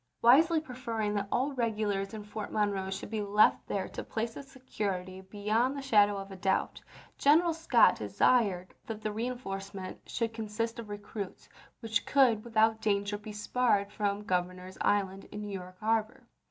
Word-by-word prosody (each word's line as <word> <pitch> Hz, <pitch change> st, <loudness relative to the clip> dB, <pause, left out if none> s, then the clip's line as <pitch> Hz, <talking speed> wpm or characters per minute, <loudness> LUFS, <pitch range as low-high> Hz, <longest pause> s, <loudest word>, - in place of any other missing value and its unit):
dSTOi. 125 Hz, +1 st, -47 dB
Wisely 315 Hz, +8 st, +6 dB
preferring 235 Hz, -7 st, -3 dB
that 205 Hz, -1 st, -1 dB
all 260 Hz, +3 st, +1 dB
the -, -, -7 dB
regulars 215 Hz, -4 st, -1 dB
in 215 Hz, -, -6 dB
Fort 210 Hz, 0 st, -6 dB
Monroe 200 Hz, -3 st, 0 dB
should 195 Hz, +2 st, -5 dB
be 220 Hz, -1 st, -1 dB
left 205 Hz, +1 st, +3 dB
there 195 Hz, -, -2 dB
to -, -, -6 dB
place 225 Hz, 0 st, -3 dB
its 280 Hz, -1 st, -10 dB
security 190 Hz, -8 st, -4 dB
be 195 Hz, +2 st, -12 dB
yond 230 Hz, +6 st, +1 dB
the -, -, -4 dB
shadow 205 Hz, -6 st, +4 dB
of 195 Hz, 0 st, -7 dB
a -, -, -7 dB
doubt, 190 Hz, 0 st, -1 dB, 0.4 s
General 325 Hz, +4 st, +5 dB
Scott 330 Hz, +1 st, +4 dB
desired 195 Hz, -7 st, +2 dB
that 220 Hz, -1 st, -6 dB
the 215 Hz, -, -1 dB
reenforcement 200 Hz, -5 st, -5 dB
should 230 Hz, -2 st, -2 dB
consist 225 Hz, +1 st, -3 dB
of 225 Hz, -2 st, -7 dB
recruits 205 Hz, -1 st, -7 dB, 0.3 s
which 225 Hz, -2 st, 0 dB
could 245 Hz, -6 st, +4 dB
without 220 Hz, -1 st, +2 dB
danger 205 Hz, -1 st, 0 dB
be 210 Hz, +1 st, -8 dB
spared 210 Hz, -1 st, +1 dB
from 205 Hz, 0 st, -1 dB
Gov 180 Hz, -3 st, +1 dB
ernor's 185 Hz, +1 st, -11 dB
Island 195 Hz, -1 st, +1 dB
in 210 Hz, -, -8 dB
New 205 Hz, -1 st, -5 dB
York 185 Hz, -1 st, -8 dB
harbor. 220 Hz, 0 st, 0 dB
210 Hz, 180 wpm, -30 LUFS, 200-230 Hz, 0.4 s, Wisely